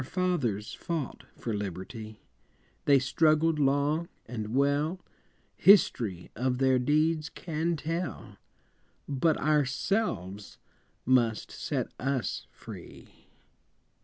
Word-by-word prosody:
Our - - -5
fathers 140 - -1
fought 165 -7 -4
for 115 - -4
liberty, 105 +3 -5 0.7
They 140 -1 +6
struggled 155 +4 +3
long 145 +4 +2 0.2
and 110 -1 -5
well, 145 +6 +2 0.6
History 120 - +4
of 125 0 0
their 130 -1 +3
deeds 155 +4 +2
can 165 0 -2
tell 165 +3 -4 0.7
But 150 +3 +2
ourselves 135 - 0 0.5
must 120 -4 +2
set - - -3
us 135 -1 -2
free. - - -12
140 Hz, 95 wpm, -29 LUFS, 120-160 Hz, 0.7 s, They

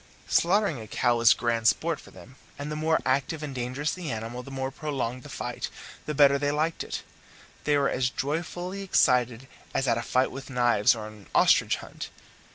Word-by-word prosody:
Slaughtering 180 - +2
a 110 - -9
cow 120 +3 +1
was 115 0 +6
grand 115 -2 0
sport 165 +6 +2
for - - -14
them, 130 - -14 0.2
and 145 +1 -5
the - - -2
more 160 +1 +2
active 140 +4 0
and 145 -2 -5
dangerous 130 +4 -2
the 180 -3 -5
animal, 115 +2 -4
the 125 - -11
more 135 0 -3
prolonged 135 -4 -3
the 145 - -11
fight, 125 -2 -4 0.4
the 150 - -2
better 140 -1 +6
they 145 0 +1
liked 155 +3 0
it; - - -5 0.6
they 150 -1 +3
were 140 -1 +3
as 125 -2 +1
joyfully 175 +7 -3
excited 125 -9 +2 0.3
as 135 - +1
at 115 -1 +2
a - - -2
fight 130 +2 +1
with 135 +1 -8
knives 120 -4 +3
or 110 -2 -6
an 105 -2 -12
ostrich - - +5
hunt. - - -8
135 Hz, 195 wpm, -27 LUFS, 120-150 Hz, 0.6 s, was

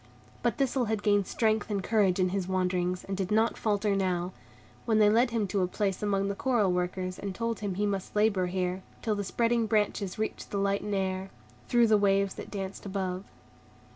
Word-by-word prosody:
But 240 - 0
Thistle 265 -2 +1
had 215 -1 -2
gained 205 -2 +3
strength 220 -2 +1
and 200 -2 -1
courage 195 -4 +2
in 185 0 +3
his 190 -1 -2
wanderings, 180 -1 0
and 195 - -4
did 190 -1 -2
not 220 +2 +2
falter 205 -1 0
now, 180 -2 0 0.5
when 220 -2 +2
they 210 -1 +6
led 235 +3 +4
him 225 -3 0
to 200 -1 0
a 180 - +2
place 195 0 -1
among 200 -1 +1
the 200 - -1
coral 215 -3 +1
workers, 180 +1 -2
and 195 -2 -4
told 230 0 -2
him 200 -3 -3
he 205 +2 0
must 195 -1 -3
labor 210 -3 +3
here, 180 0 -2 0.2
till 220 - +1
the 205 -1 -2
spreading 230 +3 +1
branches 210 -3 0
reached 220 0 -3
the 200 - -3
light 200 0 +1
and 210 -1 -2
air, 190 0 -2 0.4
through 240 -1 +4
the 215 -2 +4
waves 195 -1 +2
that - - -8
danced 195 -1 -5
above. 190 -1 -3
200 Hz, 205 wpm, -29 LUFS, 190-215 Hz, 0.5 s, they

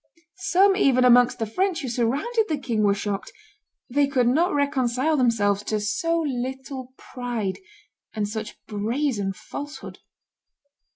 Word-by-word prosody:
Some 390 +1 +3
even 260 -9 +4
amongst 245 0 +5
the 225 - -1
French 345 - -1
who - - -3
surrounded 275 - 0
the 310 - 0
king 235 -6 -1
were 200 -1 +3
shocked; 200 0 -4 0.6
they 285 +3 +2
could 260 -3 +1
not 330 +9 +3
reconcile 280 0 +1
themselves 215 -6 +2
to 215 - -1
so 330 +12 0
little 260 0 -5
pride 240 -6 -4 0.5
and 210 -2 -2
such 215 0 -6
brazen 220 0 -1
falsehood. 290 +9 -8
250 Hz, 130 wpm, -24 LUFS, 220-290 Hz, 0.6 s, amongst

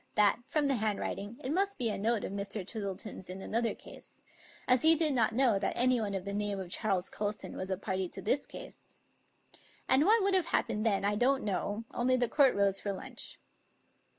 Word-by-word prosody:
that, 210 +1 +4
from 300 -2 +1
the 270 -2 +1
handwriting, 210 0 -3
it 260 - -2
must 395 +4 0
be 230 -3 0
a - - -2
note 225 +2 0
of - - -4
Mr. 200 0 -3
Twistle 200 -4 -4
ton's 190 -4 -7
in 185 +1 -6
another 230 +4 -1
case; - - -14 0.5
as 250 -1 +4
he 320 +1 +6
did 315 -2 +3
not 235 -4 +2
know 245 -6 +4
that 195 - -1
anyone 240 -5 +2
of 190 -1 -4
the 200 - -4
name 205 -1 -2
of 180 -2 -7
Charles 195 -4 +1
Colston 210 0 -4
was 185 - -5
a 190 - -1
party 190 -2 -3
to - - -8
this 265 +7 0
case. - - -11 0.9
And 265 +2 +5
what 435 +1 +5
would 395 0 +2
have 370 -3 +4
happened 215 +2 0
then 200 -2 +1
I 205 - +2
don't 265 +6 +2
know; 205 +2 -2
only 255 +1 +2
the 245 -1 +1
court 270 +1 +4
rose 200 -1 +2
for 205 - -3
lunch. 195 - -8
215 Hz, 210 wpm, -31 LUFS, 200-255 Hz, 0.9 s, he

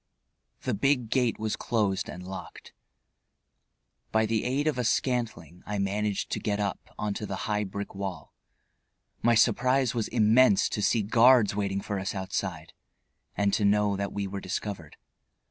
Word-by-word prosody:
The - - -1
big 125 +1 +1
gate 125 -3 +2
was 110 -1 -2
closed 105 -5 -1
and 90 +1 -8
locked. 95 - -9 1.4
By 110 0 +3
the 110 0 -1
aid 135 +4 0
of 155 -4 0
a - - +1
scantling 110 - -1
I 105 - -2
managed 100 +1 -1
to - - -1
get 105 -1 -1
up 100 -1 -4
onto 105 0 -3
the 95 - -3
high 105 -1 0
brick 100 +1 -6
wall. 95 -6 -6 0.9
My 120 0 +4
surprise 125 +3 +3
was 115 -3 -1
immense 110 -1 +4
to 105 - -3
see 110 +1 +2
guards 115 0 +5
waiting 100 -1 -1
for 100 -1 -3
us 95 +2 -3
outside, 95 -3 -4 0.6
and 100 -1 +2
to 105 - +1
know 105 0 +3
that 100 0 -3
we 100 -1 -3
were 100 0 -5
discovered. 95 -4 -5
105 Hz, 160 wpm, -28 LUFS, 100-115 Hz, 1.4 s, guards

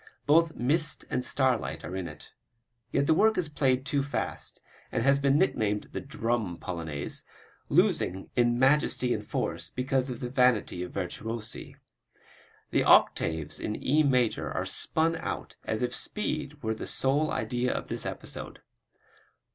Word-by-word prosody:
Both 160 +2 +4
mist 150 +5 +1
and 125 - 0
starlight 125 - 0
are 90 - -5
in 95 -2 -3
it. 75 -2 -11 0.6
Yet 140 - +2
the 160 - +4
work 220 +6 +4
is 180 -3 +1
played 135 -3 +1
too 140 +1 +1
fast, 140 +1 -3 0.3
and - - 0
has 140 0 +4
been 140 0 +3
nicknamed 110 - +1
the - - -4
"Drum" 115 -8 -2
Polonaise, 80 -5 -4 0.5
losing 95 +2 +2
in 120 -1 +3
majesty 130 -2 +3
and - - -3
force - - -3
because 130 +1 0
of 125 - -5
the 125 - -4
vanity 125 -8 +2
of 90 - -5
virtuosi. 110 +4 -5 1.0
The - - +3
octaves 80 -2 +3
in 105 - -2
E 150 +4 +2
major 125 -6 +2
are - - -2
spun 165 +1 0
out - - -5
as 110 +3 -1
if 125 0 -1
speed 150 -5 -3
were 110 0 0
the 110 - -6
sole 145 +4 +1
idea 120 +3 -1
of - - -3
this - - -3
episode. - - -6
125 Hz, 155 wpm, -29 LUFS, 110-140 Hz, 1.0 s, Both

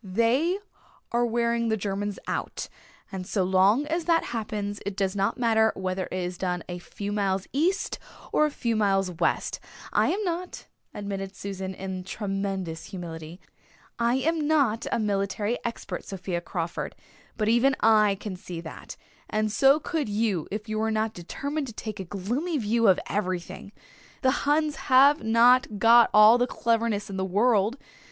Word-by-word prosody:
"They 235 - +1 0.5
are 240 0 +2
wearing 235 0 0
the 220 - +1
Germans 200 0 -3
out - - -3 0.4
and 185 -2 -6
so 195 - 0
long 190 +8 +3
as 325 +2 -2
that 330 -1 +3
happens 210 -2 -3
it 200 -1 -5
does 195 -1 0
not 195 0 0
matter 220 -2 +3
whether 185 0 -2
it - - -8
is 180 -1 -4
done 180 -2 -2
a 175 0 -5
few 200 +3 -6
miles 195 -2 0
east 345 +8 0 0.3
or 305 - +4
a - - -2
few 235 -5 -2
miles 195 -3 +2
west. 170 - -1 0.3
I - - +3
am 415 +3 -1
not," 360 -1 -4 0.3
admitted 195 -1 -5
Susan 190 -1 -5
in 190 -1 -5
tremendous 195 -4 -3
humility, 170 -2 -8 0.6
"I 235 +1 +2
am 310 +3 0
not 270 -8 +2
a - - +1
military 205 +1 -1
expert, 235 -1 -5
Sophia 180 -3 -4
Crawford, 170 -1 -4 0.4
but 215 -1 0
even 240 +4 +4
I 215 -2 +5
can 210 -3 -5
see 180 -2 -7
that, 165 -1 -9 0.3
and 215 0 0
so 270 +6 +5
could 310 -7 -2
you 205 -6 0
if 210 +2 -5
you 215 0 -2
were 220 0 +1
not 220 0 0
determined 280 - -4
to 230 - -8
take 215 -1 -6
a 190 - -4
gloomy 240 - -2
view 230 -1 +2
of 190 - +5
everything. 185 -1 -3 0.5
The 260 - +5 0.2
Huns 305 0 +2
have 275 +3 +6
not 230 0 +4
got 230 +3 +6
all 215 +3 +7
the 245 - +2
cleverness 230 -3 0
in 195 - -5
the 190 - -1
world. 210 +4 +2
210 Hz, 165 wpm, -26 LUFS, 190-240 Hz, 0.6 s, all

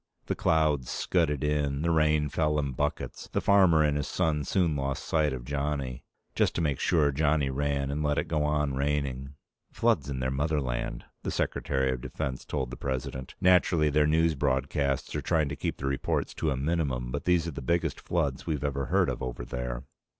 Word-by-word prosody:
The - - -1
clouds 75 -5 +2
scudded 75 -6 0
in. 75 -1 0
The 85 - +2
rain 75 -2 +3
fell 75 +1 +1
in 70 -2 0
buckets. 60 - -3
The - - +1
farmer 95 -6 +5
and 75 -1 +2
his 75 - -2
son 80 -5 0
soon 85 0 +1
lost 70 -1 -2
sight 75 -2 +2
of 60 -2 -5
Johnny. 70 -2 -2 0.3
Just - - +1
to - - 0
make 70 -4 0
sure, 75 -5 +3
Johnny 75 -1 +1
ran 70 0 -1
and 75 +2 -2
let 75 -1 +1
it - - 0
go 75 -2 0
on 75 -2 +1
raining. 70 -1 -2 0.4
"Floods 70 -1 +1
in 65 -2 -3
their 65 0 -1
motherland," 65 -4 -1 0.2
the - - -3
Secretary 65 -1 0
of 65 -1 -3
Defense 65 +1 -4
told 65 -4 -3
the 60 - -6
President. 65 0 -4
"Naturally, 90 -4 +4
their 75 +1 +3
news 80 +1 +3
broadcasts 70 0 0
are - - -1
trying 80 -4 +1
to 75 - -3
keep - - -3
the 70 - -5
reports 70 -1 -1
to 80 - -1
a 65 - 0
minimum, 70 -5 -1
but 70 +2 -4
these 90 -2 +3
are - - -2
the 70 - -7
biggest 85 +6 0
floods 70 -6 -1
we've 75 -4 -1
ever 70 -2 -1
heard - - +3
of - - -3
over - - -4
there." 60 0 -4
70 Hz, 200 wpm, -28 LUFS, 65-75 Hz, 0.4 s, farmer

